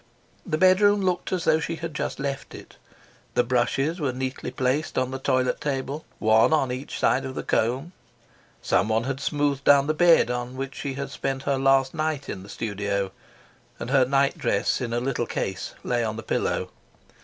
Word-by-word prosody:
The 155 Hz, -, 0 dB
bedroom 200 Hz, +3 st, +5 dB
looked 180 Hz, -1 st, -1 dB
as 185 Hz, -3 st, -1 dB
though 155 Hz, -, +3 dB
she 165 Hz, -, -3 dB
had 165 Hz, -1 st, -6 dB
just 150 Hz, -, -3 dB
left 140 Hz, -1 st, -4 dB
it: -, -, -12 dB, 0.6 s
the 125 Hz, -, +4 dB
brushes 130 Hz, +7 st, 0 dB
were 140 Hz, -4 st, 0 dB
neatly 130 Hz, +1 st, -4 dB
placed 130 Hz, +4 st, -1 dB
on 130 Hz, 0 st, 0 dB
the 135 Hz, -, -4 dB
toilet 130 Hz, -1 st, +1 dB
table, 140 Hz, +1 st, -3 dB
one 110 Hz, +4 st, +4 dB
on 135 Hz, -5 st, +2 dB
each 130 Hz, +3 st, -5 dB
side 135 Hz, -, +2 dB
of 130 Hz, 0 st, -6 dB
the -, -, -3 dB
comb; 130 Hz, +9 st, 0 dB, 0.7 s
someone 110 Hz, +4 st, +2 dB
had 135 Hz, +1 st, -3 dB
smoothed 145 Hz, -1 st, 0 dB
down 140 Hz, 0 st, +6 dB
the 155 Hz, -, +1 dB
bed 165 Hz, -6 st, +5 dB
on 125 Hz, +1 st, -4 dB
which 135 Hz, 0 st, -4 dB
she 140 Hz, -2 st, -4 dB
had 140 Hz, 0 st, -5 dB
spent 135 Hz, -1 st, -3 dB
her 140 Hz, -1 st, 0 dB
last 135 Hz, 0 st, +3 dB
night 155 Hz, -3 st, -2 dB
in 95 Hz, -, -5 dB
the 100 Hz, -, -12 dB
studio; 100 Hz, -3 st, -2 dB, 0.7 s
and 120 Hz, -, -5 dB
her 135 Hz, -2 st, +5 dB
nightdress 135 Hz, -6 st, +1 dB
in 120 Hz, -2 st, -3 dB
a 120 Hz, -, 0 dB
little 120 Hz, -2 st, -1 dB
case 95 Hz, -2 st, -4 dB
lay 120 Hz, -1 st, 0 dB
on 110 Hz, -1 st, -2 dB
the 110 Hz, -, -6 dB
pillow. -, -, -1 dB
135 Hz, 190 wpm, -25 LUFS, 125-145 Hz, 0.7 s, down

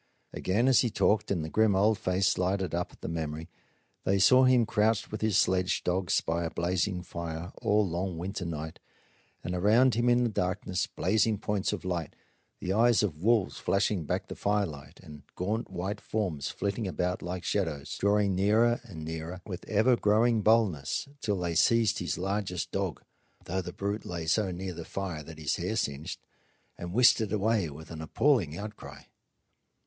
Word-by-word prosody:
Again, 105 Hz, +7 st, +1 dB
as 130 Hz, -3 st, +6 dB
he 120 Hz, -, +2 dB
talked 105 Hz, 0 st, +1 dB
and 85 Hz, -6 st, -1 dB
the -, -, -5 dB
grim 110 Hz, -2 st, +3 dB
old 105 Hz, +3 st, +4 dB
face 95 Hz, -1 st, +1 dB
lighted 95 Hz, 0 st, 0 dB
up 90 Hz, +1 st, -2 dB
at -, -, -20 dB
the -, -, -5 dB
memory, 80 Hz, 0 st, -4 dB, 0.5 s
they 100 Hz, -, +2 dB
saw 130 Hz, +7 st, +6 dB
him 125 Hz, -2 st, +5 dB
crouched 110 Hz, 0 st, +1 dB
with 110 Hz, -, -5 dB
his 110 Hz, -3 st, +2 dB
sledge 90 Hz, 0 st, +2 dB
dogs 90 Hz, -1 st, +1 dB
by 85 Hz, +1 st, -1 dB
a 85 Hz, -, -2 dB
blazing 90 Hz, +2 st, -1 dB
fire 85 Hz, 0 st, -6 dB
all 105 Hz, 0 st, +3 dB
the 90 Hz, -, -4 dB
long 90 Hz, 0 st, -2 dB
winter 95 Hz, +3 st, -4 dB
night, 80 Hz, -1 st, -5 dB, 0.6 s
and 85 Hz, -, -3 dB
around 110 Hz, +8 st, +4 dB
him 120 Hz, +2 st, +2 dB
in 120 Hz, 0 st, +4 dB
the 120 Hz, -, +1 dB
darkness 95 Hz, -1 st, -1 dB
blazing 105 Hz, +3 st, +1 dB
points 100 Hz, -1 st, -1 dB
of 105 Hz, -3 st, -5 dB
light, 85 Hz, -4 st, -3 dB, 0.4 s
the 95 Hz, -, -2 dB
eyes 115 Hz, +1 st, +4 dB
of 80 Hz, -7 st, -2 dB
wolves 110 Hz, -1 st, +2 dB
flashing 100 Hz, -4 st, 0 dB
back -, -, -2 dB
the -, -, -7 dB
firelight, 85 Hz, -7 st, -2 dB
and 75 Hz, -4 st, -11 dB
gaunt 105 Hz, +6 st, -2 dB
white 95 Hz, +3 st, -4 dB
forms 90 Hz, -10 st, -2 dB
flitting 100 Hz, +1 st, -2 dB
about 90 Hz, 0 st, -2 dB
like 90 Hz, 0 st, -5 dB
shadows, 80 Hz, -7 st, -2 dB
drawing 100 Hz, -1 st, +2 dB
nearer 110 Hz, +5 st, +3 dB
and 85 Hz, -10 st, -9 dB
nearer 80 Hz, +3 st, -5 dB
with 95 Hz, -3 st, -6 dB
ever 110 Hz, +4 st, +4 dB
growing 110 Hz, +1 st, +3 dB
boldness 105 Hz, -, +2 dB
till 105 Hz, -5 st, -1 dB
they 85 Hz, -2 st, -2 dB
seized 115 Hz, +7 st, +3 dB
his 85 Hz, -3 st, -2 dB
largest 95 Hz, -1 st, -2 dB
dog -, -, -3 dB, 0.4 s
though 95 Hz, +2 st, -2 dB
the 90 Hz, -, -7 dB
brute 100 Hz, +3 st, -3 dB
lay 85 Hz, -2 st, -5 dB
so 95 Hz, +4 st, +1 dB
near 90 Hz, +1 st, -5 dB
the 85 Hz, 0 st, -7 dB
fire 90 Hz, -3 st, -4 dB
that 80 Hz, +1 st, -11 dB
his 75 Hz, -3 st, -1 dB
hair -, -, -2 dB
singed 70 Hz, +1 st, -3 dB, 0.6 s
and 85 Hz, 0 st, -7 dB
whisked 120 Hz, +3 st, +5 dB
it 110 Hz, -, -2 dB
away 105 Hz, -4 st, +1 dB
with 75 Hz, +3 st, -11 dB
an 80 Hz, -1 st, -6 dB
appalling 85 Hz, -, +1 dB
outcry. 105 Hz, +2 st, -8 dB
95 Hz, 185 wpm, -29 LUFS, 85-105 Hz, 0.6 s, as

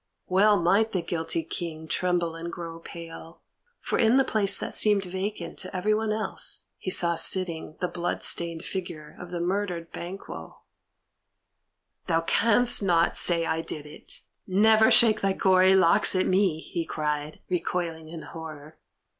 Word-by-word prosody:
Well 200 Hz, +2 st, +4 dB
might 200 Hz, +6 st, +2 dB
the 180 Hz, -3 st, -1 dB
guilty 165 Hz, -1 st, -2 dB
King 160 Hz, -1 st, -6 dB
tremble 175 Hz, 0 st, 0 dB
and 170 Hz, +1 st, -6 dB
grow 165 Hz, -1 st, -7 dB
pale, 165 Hz, 0 st, -11 dB, 0.4 s
for -, -, -2 dB
in 235 Hz, +2 st, +4 dB
the 270 Hz, -, +5 dB
place 200 Hz, -5 st, +2 dB
that -, -, -5 dB
seemed 210 Hz, -2 st, +3 dB
vacant 190 Hz, +3 st, -5 dB
to 185 Hz, 0 st, -6 dB
everyone 215 Hz, +3 st, 0 dB
else 220 Hz, +1 st, -2 dB
he -, -, -4 dB
saw 170 Hz, -2 st, +4 dB
sitting 165 Hz, -1 st, +1 dB
the 180 Hz, -, +1 dB
blood 175 Hz, 0 st, -3 dB
stained 170 Hz, -1 st, -1 dB
figure 165 Hz, -5 st, -6 dB
of 180 Hz, -, -9 dB
the 175 Hz, -1 st, -4 dB
murdered 180 Hz, -1 st, -2 dB
Banquo. 170 Hz, -, -9 dB, 1.4 s
"Thou 165 Hz, 0 st, +2 dB
canst 230 Hz, +8 st, +3 dB
not 175 Hz, -4 st, +2 dB
say 170 Hz, -2 st, +1 dB
I 160 Hz, 0 st, -1 dB
did 150 Hz, -2 st, -6 dB
it; 150 Hz, -, -9 dB, 0.3 s
never 220 Hz, +3 st, +5 dB
shake 225 Hz, -3 st, +5 dB
thy 195 Hz, -1 st, +1 dB
gory 190 Hz, 0 st, +4 dB
locks 185 Hz, 0 st, +4 dB
at 185 Hz, -, +2 dB
me!" 185 Hz, -4 st, +2 dB
he 165 Hz, +1 st, -4 dB
cried, 150 Hz, -1 st, -3 dB
recoiling 165 Hz, -2 st, -3 dB
in 165 Hz, -1 st, -8 dB
horror. 155 Hz, -2 st, -10 dB
175 Hz, 155 wpm, -26 LUFS, 165-195 Hz, 1.4 s, the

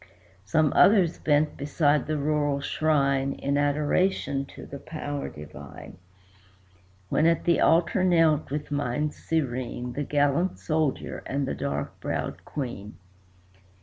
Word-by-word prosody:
Some 150 Hz, +9 st, +2 dB
others 190 Hz, -5 st, +5 dB
bent 150 Hz, 0 st, +1 dB
beside 145 Hz, +1 st, +1 dB
the 155 Hz, 0 st, -1 dB
rural 145 Hz, -1 st, 0 dB
shrine 140 Hz, -2 st, +1 dB
In 140 Hz, +1 st, -2 dB
adoration 145 Hz, 0 st, +1 dB
to -, -, -11 dB
the 140 Hz, -, -8 dB
Power 145 Hz, -2 st, -5 dB
divine; 75 Hz, +1 st, -11 dB, 1.1 s
When 160 Hz, -, +3 dB
at 165 Hz, 0 st, +2 dB
the 170 Hz, -1 st, +3 dB
altar 175 Hz, +3 st, +3 dB
knelt, 165 Hz, -4 st, +3 dB
with 145 Hz, +1 st, -4 dB
minds 145 Hz, +1 st, -1 dB
serene, 125 Hz, -5 st, -2 dB
The 145 Hz, -, -3 dB
gallant 145 Hz, +5 st, +1 dB
Soldier 155 Hz, -3 st, -1 dB
and 140 Hz, 0 st, -1 dB
the -, -, -2 dB
dark 140 Hz, -, -4 dB
browed -, -, -4 dB
Queen. 120 Hz, -7 st, -6 dB
145 Hz, 125 wpm, -26 LUFS, 140-155 Hz, 1.1 s, others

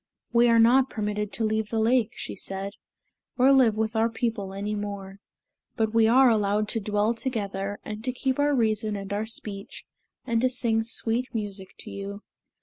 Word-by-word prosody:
"We 240 Hz, 0 st, +5 dB
are 230 Hz, -, +5 dB
not 250 Hz, +4 st, +5 dB
permitted 210 Hz, -1 st, -3 dB
to 225 Hz, -, -2 dB
leave 220 Hz, -1 st, 0 dB
the 225 Hz, -, -2 dB
lake," 230 Hz, 0 st, +2 dB
she -, -, -5 dB
said, 195 Hz, +1 st, -5 dB, 0.6 s
"or 260 Hz, +2 st, +5 dB
live 255 Hz, -6 st, +5 dB
with 220 Hz, 0 st, -1 dB
our 225 Hz, +1 st, +3 dB
people 225 Hz, -4 st, -2 dB
any 200 Hz, +2 st, -3 dB
more. 200 Hz, -1 st, -5 dB, 0.6 s
But 220 Hz, -1 st, 0 dB
we 225 Hz, -1 st, +5 dB
are 260 Hz, +3 st, +6 dB
allowed 210 Hz, -2 st, +2 dB
to 225 Hz, -, -1 dB
dwell 210 Hz, +2 st, +1 dB
together 205 Hz, -5 st, -3 dB
and 215 Hz, 0 st, -6 dB
to 255 Hz, -, +1 dB
keep 260 Hz, +1 st, -2 dB
our 290 Hz, 0 st, +3 dB
reason 215 Hz, -3 st, +1 dB
and 200 Hz, 0 st, -5 dB
our 210 Hz, +2 st, -2 dB
speech, 205 Hz, -3 st, -6 dB, 0.4 s
and 230 Hz, -2 st, +1 dB
to 255 Hz, -, +3 dB
sing 230 Hz, -3 st, +1 dB
sweet 230 Hz, +2 st, -1 dB
music 200 Hz, -3 st, -4 dB
to -, -, -10 dB
you." 200 Hz, +1 st, -7 dB
220 Hz, 185 wpm, -26 LUFS, 205-235 Hz, 0.6 s, are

